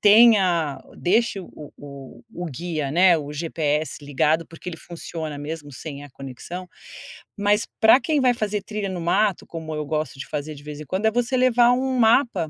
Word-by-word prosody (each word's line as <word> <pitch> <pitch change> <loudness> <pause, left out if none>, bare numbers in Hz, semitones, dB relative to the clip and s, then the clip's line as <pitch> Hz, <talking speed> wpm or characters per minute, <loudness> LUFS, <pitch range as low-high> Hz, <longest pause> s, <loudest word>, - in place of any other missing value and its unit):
tenha 200 -9 +5 0.2
deixe 205 +2 +1
o 155 -5 -11
o 140 -2 -11
o 175 0 -4
guia, 155 -1 -3
né, 180 0 +6
o 145 -1 -6
GPS 150 -2 -2
ligado, 150 +4 +1
porque 165 +2 -10
ele 170 - -6
funciona 160 -3 -6
mesmo 145 -1 -6
sem 140 +2 -7
a 145 - -13
conexão. 135 +8 -8 0.7
Mas 205 +2 +2
pra 225 +4 +7
quem 305 -3 +1
vai 250 -1 +4
fazer 210 -3 -2
trilha 210 -2 -4
no 180 -2 -4
mato, 195 +4 +1
como 160 -2 -6
eu 150 -1 -3
gosto 155 -2 -3
de - - -6
fazer 150 0 -4
de 145 - -13
vez 150 -1 -8
em 150 - -8
quando, 190 +7 -2
é 220 - +3
você 245 +2 0
levar 245 -1 +5
um 260 0 0
mapa, 225 - +3
170 Hz, 185 wpm, -23 LUFS, 150-210 Hz, 0.7 s, pra